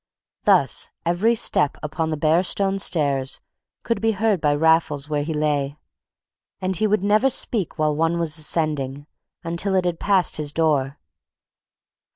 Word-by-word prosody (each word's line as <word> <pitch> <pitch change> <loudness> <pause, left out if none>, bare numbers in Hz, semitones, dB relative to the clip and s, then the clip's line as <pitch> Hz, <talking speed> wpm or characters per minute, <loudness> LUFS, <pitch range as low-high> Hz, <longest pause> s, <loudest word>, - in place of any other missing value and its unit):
Thus - - +2 0.2
every 185 +8 +2
step 150 -9 +1
upon 160 +1 -2
the 155 - -2
bare 160 +3 +3
stone 195 +1 -1
stairs 140 -8 0 0.4
could 230 -3 -2
be 225 0 +2
heard 210 -3 0
by 145 -1 +2
Raffles 160 -2 +2
where 150 -1 0
he 155 +3 -4
lay; 150 -2 -1 0.8
and 190 0 -2
he 215 +5 +1
would 210 -2 +1
never 215 +6 +3
speak 220 -8 -1
while 155 -1 +1
one 165 +2 +1
was 165 -2 +1
ascending, 145 -3 -2 0.4
until 170 +4 -1
it 185 -1 +1
had 175 -2 -2
passed 195 -4 +1
his 150 -2 -4
door. 145 -4 0
160 Hz, 155 wpm, -22 LUFS, 150-190 Hz, 0.8 s, bare